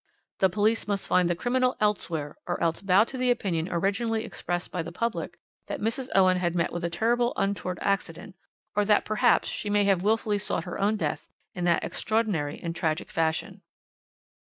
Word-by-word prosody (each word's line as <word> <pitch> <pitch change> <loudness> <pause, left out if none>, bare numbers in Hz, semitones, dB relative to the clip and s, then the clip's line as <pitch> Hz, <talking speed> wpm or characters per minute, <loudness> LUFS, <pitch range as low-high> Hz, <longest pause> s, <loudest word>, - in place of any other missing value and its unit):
The 190 - +4
police 215 +4 +1
must 200 -1 -1
find 180 -1 +3
the 175 - +1
criminal 250 +6 +1
elsewhere, 170 -8 -1
or 175 - -1
else 165 -1 0
bow 195 +1 +5
to 260 +3 -6
the 255 0 +2
opinion 180 -9 0
originally 210 +6 0
expressed 175 0 -4
by 180 - -2
the 165 +1 -6
public 230 +6 -3 0.3
that - - -4
Mrs. 230 +4 -2
Owen 185 -1 +5
had 175 -1 -1
met 170 -1 0
with 175 0 -4
a 170 - 0
terrible 240 +7 +1
untoward 190 -2 -1
accident, 190 -2 -2 0.4
or 210 - +3
that 210 0 +3
perhaps 235 +3 +3
she 205 - -3
may 205 0 +3
have 195 -3 +3
wilfully 210 0 +1
sought 190 -4 -2
her 180 +2 -5
own 210 +2 +2
death 210 - -3 0.2
in 175 -1 -3
that 170 -1 +2
extraordinary 205 -10 -1
and 170 -1 -4
tragic 160 -2 -2
fashion. 160 -1 -1
195 Hz, 185 wpm, -27 LUFS, 175-220 Hz, 0.4 s, bow